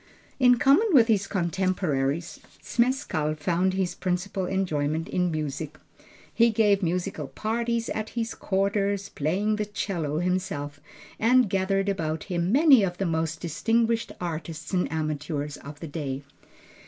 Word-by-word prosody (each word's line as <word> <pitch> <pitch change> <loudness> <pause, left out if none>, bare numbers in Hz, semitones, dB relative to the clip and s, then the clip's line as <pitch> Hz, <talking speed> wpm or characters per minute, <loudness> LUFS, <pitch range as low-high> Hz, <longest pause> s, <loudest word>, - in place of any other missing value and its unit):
In 250 -2 +6
common 280 - +5
with 240 -5 +6
his 205 -3 +2
contemporaries, 170 -5 -1 0.2
Zmeskall 235 - 0
found 180 +4 +1
his 190 -2 0
principal 185 +1 -2
enjoyment 160 -5 -1
in 180 -1 0
music. 155 -1 -4 0.6
He 235 0 +5
gave 210 -3 +3
musical 180 +2 -2
parties 230 +1 -2
at 215 0 -3
his 225 -1 -1
quarters, 200 0 0
playing 195 +9 0
the 210 - -1
cello 170 -7 -2
himself, 165 -5 -2 0.4
and 250 +2 +4
gathered 195 +1 0
about 160 -5 -1
him 175 -1 -1
many 275 -2 +7
of 175 -3 -1
the 195 - -1
most 160 -1 -1
distinguished 225 +7 0
artists 165 -1 -5
and 180 -1 +1
amateurs 150 -1 -3
of 145 +1 -10
the 165 - -5
day. 145 -3 -4
185 Hz, 135 wpm, -26 LUFS, 160-210 Hz, 0.6 s, many